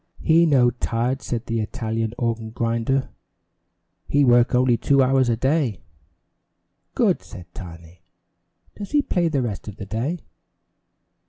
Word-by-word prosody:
"He 165 +1 +4
no 125 -5 +4
tired," 120 +2 -2
said 120 0 -4
the 115 -2 -2
Italian 110 +1 -3
organ 115 -2 -2
grinder. 115 +3 -1 1.0
"He 145 0 +3
work 120 0 +4
only 125 -1 +4
two 140 +3 +3
hours 130 -1 +2
a 115 - +1
day." 135 - 0 1.1
"Good!" - - +2
said 90 - -11
Tiny. 85 -1 -11 0.7
"Does 205 - -7
he 290 -1 +4
play 175 -8 0
the 140 -5 0
rest 110 -3 -5
of 105 - -7
the 100 - -8
day?" 120 - -2
120 Hz, 140 wpm, -22 LUFS, 115-135 Hz, 1.1 s, He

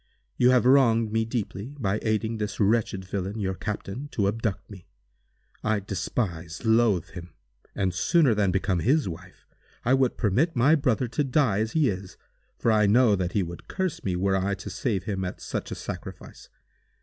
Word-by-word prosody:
You 125 - +4
have 125 -1 +4
wronged 115 -4 +4
me 110 0 +1
deeply, 115 +2 -4
by 105 -2 0
aiding 110 +1 -1
this 105 -1 -4
wretched 100 -3 +1
villain, 100 +3 -4
your 95 -2 -1
captain, 105 +6 -5
to 100 -3 +1
abduct 105 -2 -2
me. 95 -4 -13 0.8
I 110 -1 +1
despise, 95 -3 -4
loathe 110 -6 +3
him; 85 -4 -10 0.4
and, 95 -2 0
sooner 135 - +3
than 105 -2 +1
become 95 -1 0
his 140 - +2
wife, 80 -3 -9 0.4
I 125 - +3
would 130 -2 +2
permit 125 - +1
my 130 +6 +4
brother 130 -5 +1
to 150 - 0
die 130 -6 +2
as 110 +1 -1
he 155 -4 +3
is, 95 -3 -4 0.4
for 115 - +1
I 105 -1 +4
know 110 0 +5
that 90 -2 -2
he 100 - +1
would 85 0 -8
curse 190 -4 -3
me 95 -2 -1
were 95 +2 +1
I 95 +1 0
to - - -8
save 105 -8 -2
him 95 -1 -3
at 90 - -5
such - - -5
a - - -4
sacrifice. - - -8
105 Hz, 185 wpm, -26 LUFS, 95-120 Hz, 0.8 s, know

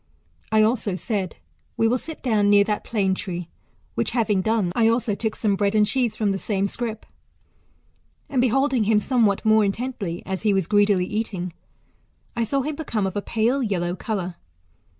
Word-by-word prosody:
1 220 -1 +4
also 215 -4 +1
said. 195 -2 -3 0.4
We 225 - +3
will 250 +3 +1
sit 320 +4 -9
down 215 -5 +2
near 205 0 +6
thslt 210 0 -2
plane 195 -4 0
tree; 180 -2 -5 0.4
which - - 0
having 210 -4 +2
done, 220 -3 +1
I 225 -1 +4
also 230 -1 +1
took 220 +1 -2
some 205 -3 +1
bread 200 +1 0
and 210 -1 +5
cheese 245 0 0
from 210 -2 0
the 195 - -2
same 200 -1 -1
scrip. 225 +1 -4 1.2
And 260 -3 +1
beholdifg 260 -1 +2
him 215 0 +3
somewhat 220 -3 +2
more 220 0 +5
intently, 200 -4 -3
as 190 -1 -3
he 210 -2 +2
was 190 -3 +1
greedily 205 -1 +3
eating, 190 -4 -3 0.8
I 235 -1 0
saw 275 +5 0
him 300 +1 -3
become 230 -10 -2
of 190 - -3
a 205 - -1
pale 230 +6 0
yellow 180 -6 -1
colour. 185 -3 -4
215 Hz, 180 wpm, -23 LUFS, 195-230 Hz, 1.2 s, near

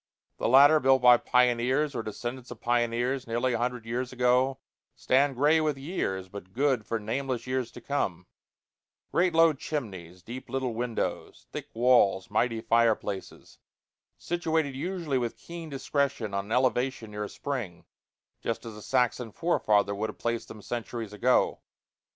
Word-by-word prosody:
The - - 0
latter, 145 +5 +7
built 130 -2 +3
by 125 -1 +8
pioneers 125 +4 +2
or 120 - -2
descendants 120 +4 -6
of 120 - -9
pioneers, 120 +2 0
nearly 120 +2 0
a 115 - -1
hundred 120 -1 -2
years 120 +2 -3
ago, 125 +1 +2 0.4
stand 135 +1 +2
gray 150 +5 +4
with 150 -3 0
years, 135 - -3
but 95 -1 -10
good 130 -4 +1
for 115 - -1
nameless 120 +2 -3
years 130 -2 -2
to 120 - -10
come; 95 -10 -2 0.9
great 175 -1 +2
low 165 -1 +6
chimneys, 95 - -6
deep 125 +3 -8
little 130 -2 -2
windows, 120 0 -3
thick - - -6
walls, 115 -6 +3
mighty 115 +1 +1
fireplaces; 110 -4 0 0.6
situated 160 -5 -1
usually 165 -3 -2
with 120 -2 -3
keen 170 -1 -9
discretion 135 -5 -1
on 100 0 -1
an 105 - -11
elevation 125 -2 0
near 105 0 -4
a - - -8
spring, 120 -12 -5 0.6
just 115 0 -3
as 115 -2 -7
a 105 - -10
Saxon 125 -1 0
forefather 105 -10 +1
would 110 +2 -2
have - - -9
placed 115 -1 -2
them 105 -2 -11
centuries 115 -2 -5
ago. 125 +5 +2
125 Hz, 155 wpm, -28 LUFS, 115-135 Hz, 0.9 s, by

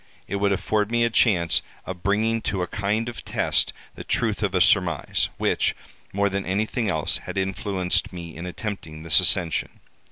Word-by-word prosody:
It 100 - -2
would 100 0 +1
afford 105 +1 0
me 120 0 +2
a 115 - +2
chance 90 -8 +3 0.2
of 95 -2 -6
bringing 110 +4 +1
to 95 -3 -1
a - - -3
kind 105 +3 -1
of 120 -5 -7
test - - +1 0.2
the - - -9
truth 110 -3 -1
of 100 -3 0
a - - +3
surmise, 95 -2 +3
which, - - +1 0.4
more 100 +1 +1
than 100 0 -2
anything 110 +4 -1
else, 80 -5 +1
had - - -7
influenced 95 -1 0
me 85 -3 -8
in 85 +3 -6
attempting 85 -5 -6
this 80 -4 +5
ascension. 85 -3 +1
100 Hz, 180 wpm, -24 LUFS, 90-105 Hz, 0.4 s, this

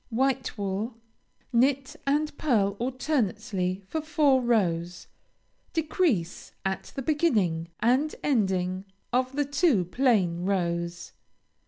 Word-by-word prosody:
White 260 +1 0
wool 205 +4 -2 0.6
Knit 265 +2 +2
and 300 +2 +1
pearl 205 -9 +2
alternately 215 -8 -1
for 315 - -2
four 295 -4 +3
rows; 180 -7 0 0.7
decrease 305 - 0
at 190 0 -3
the 270 - -3
beginning 215 - +1
and 260 +7 +2
ending 190 -7 +1 0.3
of 255 +1 +1
the 290 0 +1
two 285 - +2
plain 185 -5 +2
rows. 170 -2 -1
230 Hz, 105 wpm, -27 LUFS, 185-275 Hz, 0.7 s, four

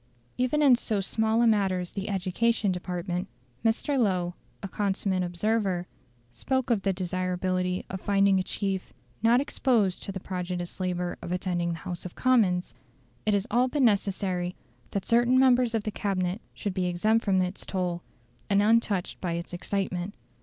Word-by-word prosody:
Even 255 +4 +1
in 270 -4 +7
so 220 -3 -1
small 220 +4 +1
a - - +5
matter 200 -5 +3
as 180 -1 -5
the 200 +1 -4
Education 200 +3 +1
Department, 180 0 -3 0.4
Mr. 250 +5 +1
Lowe, 180 -6 +1 0.3
a - - -2
consummate 195 -1 -1
observer, 180 0 0 0.5
spoke 260 - -1
of 220 -4 +2
the 195 - +1
desirability 185 0 -1
of 190 0 -6
finding 200 -1 +3
a - - 0
chief 195 0 -3 0.3
"not 230 +2 +5
exposed 235 -8 +1
to - - -4
the 190 - -5
prodigious 180 -1 -4
labour 180 -1 -2
of - - -6
attending 175 -2 -1
the - - -5
House 175 +1 -6
of 180 - -8
Commons". 210 -9 +2 0.5
It 210 - +4
is 200 0 0
all 245 +2 +4
but 280 +1 0
necessary 195 -4 +1 0.3
that 195 -2 -3
certain 240 +2 +4
members 250 -3 +4
of 220 - 0
the 215 - -2
Cabinet 195 -1 -1
should 200 - -3
be 185 -1 0
exempt 215 +6 +2
from 190 -2 +2
its 185 +1 -2
toil, 180 -2 -2 0.5
and 200 -1 +4
untouched 210 -3 +2
by 175 -2 -1
its 170 +1 -5
excitement. 190 +1 -2
195 Hz, 165 wpm, -27 LUFS, 180-220 Hz, 0.5 s, in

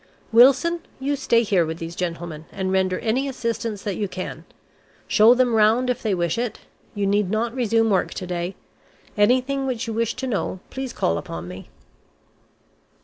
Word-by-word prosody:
Wilson, 270 +9 +5 0.2
you 280 +2 0
stay 235 -4 +2
here 195 -5 +2
with 160 0 -4
these 165 0 -6
gentlemen, 170 -3 -4
and 190 -1 -2
render 190 -1 +1
any 250 +5 0
assistance 230 -5 -3
that 205 -3 -3
you 205 - -1
can. 185 0 -6 0.6
Show 225 +3 +6
them 250 -1 +2
round 225 +4 +4
if 250 - -4
they 210 -4 0
wish 175 +3 -1
it. 240 -3 -3 0.3
You 205 -1 0
need 200 -1 +1
not 225 +3 -1
resume 225 -3 +2
work 190 -2 +1
to 185 - -4
day. 180 +1 -3 0.6
Anything 255 +6 +2
which 250 -2 -2
you 225 - -4
wish 230 0 -1
to 265 - -4
know, 205 -6 -2
please 265 -1 -4
call 85 - 0
upon 85 +1 -7
me." 90 +1 -9
220 Hz, 175 wpm, -23 LUFS, 185-250 Hz, 0.6 s, Show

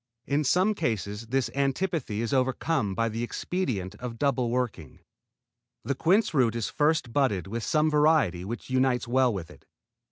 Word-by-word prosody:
In 145 +2 +1
some 185 +9 +3
cases 110 - -3
this 130 +1 0
antipathy 140 - -1
is 115 - -2
overcome 130 -4 0
by 115 +2 +1
the 115 +1 -3
expedient 120 - -3
of 125 -2 -6
double 130 -3 +1
working. 120 - -3 0.8
The 140 - -1
quince 185 +8 +2
root 120 -6 +2
is 115 -2 -2
first 150 -5 +1
budded 130 -10 +1
with 115 +4 -4
some 155 0 +2
variety 150 - +3
which 115 +6 -6
unites 130 -2 +1
well 130 +1 +3
with 95 -7 -6
it. - - -18
125 Hz, 160 wpm, -27 LUFS, 115-145 Hz, 0.8 s, some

